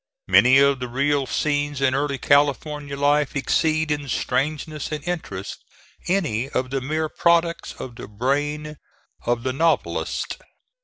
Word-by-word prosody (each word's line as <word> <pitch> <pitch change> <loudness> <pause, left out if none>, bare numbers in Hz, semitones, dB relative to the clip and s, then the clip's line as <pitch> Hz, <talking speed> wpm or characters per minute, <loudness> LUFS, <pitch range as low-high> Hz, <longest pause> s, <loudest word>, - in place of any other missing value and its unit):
Many 130 +2 +6
of 140 -1 +4
the 125 - -4
real 140 +2 0
scenes 145 -1 -1
in 135 -1 +2
early 140 0 0
California 145 +1 +1
life 145 0 +2
exceed 155 +2 +1
in 145 -2 -2
strangeness 150 +4 -2
and 150 -1 -4
interest 100 - -5 0.4
any 140 - 0
of 130 -2 -2
the 135 -1 -1
mere 155 +4 -1
products 170 +1 +1
of 120 -3 -9
the - - -8
brain 145 +7 -2 0.5
of 120 -1 +1
the 130 0 -1
novelist. 165 +4 0
145 Hz, 140 wpm, -23 LUFS, 130-150 Hz, 0.5 s, Many